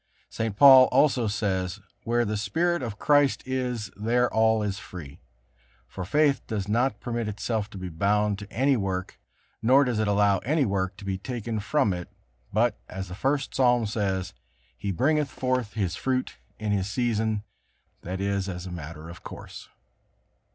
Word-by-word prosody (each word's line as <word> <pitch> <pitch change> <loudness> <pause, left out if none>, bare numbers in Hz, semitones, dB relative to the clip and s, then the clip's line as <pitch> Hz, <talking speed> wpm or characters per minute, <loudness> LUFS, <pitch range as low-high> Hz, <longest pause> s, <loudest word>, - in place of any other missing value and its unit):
St. 110 -3 -2
Paul 130 -1 +10
also 130 -4 +3
says: 95 -3 -1 0.3
"Where 120 +1 +2
the 105 0 -2
Spirit 165 +12 0
of 115 -4 -5
Christ 145 +1 +3
is, 125 -6 -2
there 120 +4 +1
all 110 -1 +3
is 100 -2 -2
free." 75 -7 -10 0.7
For 90 +9 -7
faith 145 - +2
does 105 -4 -3
not 120 +6 +1
permit 120 -2 -3
itself 105 0 -2
to - - -10
be 95 -1 -5
bound 100 +4 +1
to 100 0 -10
any 135 +3 +2
work, 95 -4 -3 0.4
nor 130 +5 +5
does 125 -5 -1
it 110 - +1
allow 100 -1 +3
any 145 - +1
work 95 -2 -1
to 100 - -10
be 95 -1 -2
taken 115 -1 -4
from 110 -1 +1
it, 90 -1 -5 0.4
but, - - +1
as 95 0 -6
the - - -6
First 135 +8 -1
Psalm 125 -3 +3
says, 100 -3 -2 0.4
"He 100 +11 -3
bringeth 145 - +1
forth 125 -5 -1
his 95 -5 -1
fruit 130 +2 -1 0.2
in 105 -1 -2
his 100 -1 0
season," 110 -2 0 0.6
that 95 +2 -5
is, 100 0 -1
as 90 -1 -6
a 90 - -7
matter 80 -1 -8
of 85 +1 -10
course. - - -10
105 Hz, 170 wpm, -26 LUFS, 95-125 Hz, 0.7 s, Paul